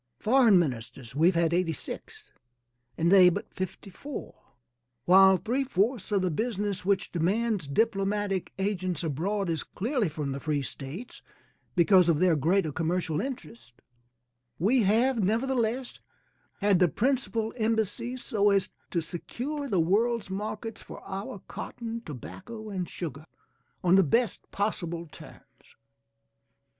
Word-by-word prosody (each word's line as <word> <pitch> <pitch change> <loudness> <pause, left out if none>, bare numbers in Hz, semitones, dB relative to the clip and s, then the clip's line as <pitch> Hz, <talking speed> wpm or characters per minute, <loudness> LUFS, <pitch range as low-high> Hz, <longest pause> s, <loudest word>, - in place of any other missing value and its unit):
Foreign 230 -3 +5
ministers 125 -4 -3
we 160 +4 +4
have 185 - +3
had 165 -1 +2
86, 185 - -4 0.7
and 170 +2 +2
they 185 -2 +8
but 175 - -5
54. 190 +8 -6 0.7
While 190 +2 +7
three 245 +8 -1
fourths 225 -2 0
of 200 -2 +2
the 180 - +1
business 205 0 -2
which 195 +1 0
demands 195 +1 0
diplomatic 195 +2 0
agents 185 -4 -1
abroad 180 +7 -1
is 165 -2 -1
clearly 230 - -1
from 150 -2 -4
the 135 - -4
free 145 -1 -1
States 150 - -8 0.5
because 180 0 +5
of 165 - +4
their 180 0 +4
greater 160 +3 +2
commercial 165 0 -1
interests, 150 - -7 0.8
we 230 +9 +3
have, 225 +3 +3
nevertheless, 240 +3 0 0.6
had 200 -3 +4
the 180 - +5
principal 230 - 0
embassies 230 +2 -1
so 205 -2 +2
as 195 -2 +2 0.2
to 170 - 0
secure 265 - -5
the 195 -5 +2
world's 210 +5 +1
markets 215 +3 -5
for - - -10
our 195 0 -6
cotton, 230 -1 -6
tobacco 215 - -8
and 185 -3 -3
sugar, 155 -2 -6 0.6
on 180 0 +4
the 195 0 +7
best 230 - 0
possible 175 -5 -2
terms. 155 - -16
195 Hz, 130 wpm, -28 LUFS, 170-225 Hz, 0.8 s, they